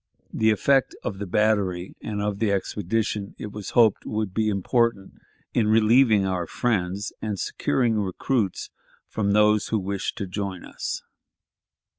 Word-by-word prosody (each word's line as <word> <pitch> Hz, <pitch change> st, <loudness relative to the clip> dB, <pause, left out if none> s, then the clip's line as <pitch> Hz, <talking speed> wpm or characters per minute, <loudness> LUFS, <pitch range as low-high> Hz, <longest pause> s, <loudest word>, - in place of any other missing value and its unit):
The 110 Hz, -, +2 dB
effect 135 Hz, +5 st, +2 dB
of 95 Hz, -, -4 dB
the 100 Hz, -, -4 dB
battery 95 Hz, -3 st, +1 dB
and 105 Hz, -1 st, -3 dB
of 105 Hz, -1 st, -2 dB
the 110 Hz, -2 st, +1 dB
expedition, 100 Hz, +1 st, -2 dB
it 105 Hz, -, -7 dB
was 105 Hz, -2 st, -7 dB
hoped, 115 Hz, -4 st, +5 dB
would 105 Hz, -3 st, -3 dB
be 110 Hz, +1 st, +1 dB
important 105 Hz, 0 st, 0 dB, 0.3 s
in 110 Hz, -3 st, +2 dB
relieving 110 Hz, -1 st, +5 dB
our 90 Hz, -3 st, -1 dB
friends 100 Hz, -3 st, -1 dB
and 105 Hz, -2 st, -3 dB
securing 115 Hz, -4 st, 0 dB
recruits 100 Hz, +1 st, -1 dB, 0.4 s
from 100 Hz, -2 st, 0 dB
those 105 Hz, 0 st, +4 dB
who 110 Hz, -, 0 dB
wished 100 Hz, 0 st, -3 dB
to 100 Hz, -, -3 dB
join 95 Hz, -1 st, -5 dB
us. -, -, -5 dB
105 Hz, 145 wpm, -25 LUFS, 95-110 Hz, 0.4 s, hoped